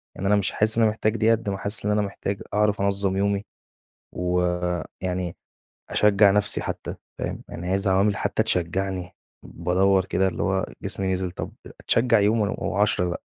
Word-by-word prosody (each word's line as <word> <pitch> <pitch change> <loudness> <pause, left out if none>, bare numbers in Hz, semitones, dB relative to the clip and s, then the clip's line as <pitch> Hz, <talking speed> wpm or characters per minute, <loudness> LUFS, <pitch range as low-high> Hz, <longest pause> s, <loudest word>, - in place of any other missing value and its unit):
يعني 95 - -3
أنا 105 - +4
مش 100 -2 +1
حاسس 110 +1 0
إن - - +4
أنا 110 - +4
محتاج 110 +1 -1
ديّة، 110 +1 +3
قد 115 -2 0
ما 95 - -2
حاسس 100 +1 -2
إن 105 - +2
أنا 105 0 +2
محتاج 100 0 -4
أعرف 105 -1 +2
أنظّم 100 -1 +1
يومي، 100 0 0 0.7
و 90 0 0 0.6
يعني 90 -1 -3 0.5
أشجّع 105 -1 +5
نفسي 105 0 +2
حتى - - -5 0.2
فاهم، - - -4
يعني 90 +2 -6
عايز 95 +2 0
عوامل 95 +2 +3
حتى - - 0
تشجعني، 90 +1 -1 0.3
بادوّر 95 +2 +2
كده 95 0 +1
اللي 95 - -2
هو 95 -1 0 0.2
جسمي 95 -1 -2
نزل، 90 -1 -1
طَب 85 - -6 0.3
أتشجع 115 -2 +3
يوم 105 +3 +3
ون 105 -1 0
و10 100 -3 +1
لأ، - - -4
100 Hz, 180 wpm, -24 LUFS, 95-105 Hz, 0.7 s, أشجّع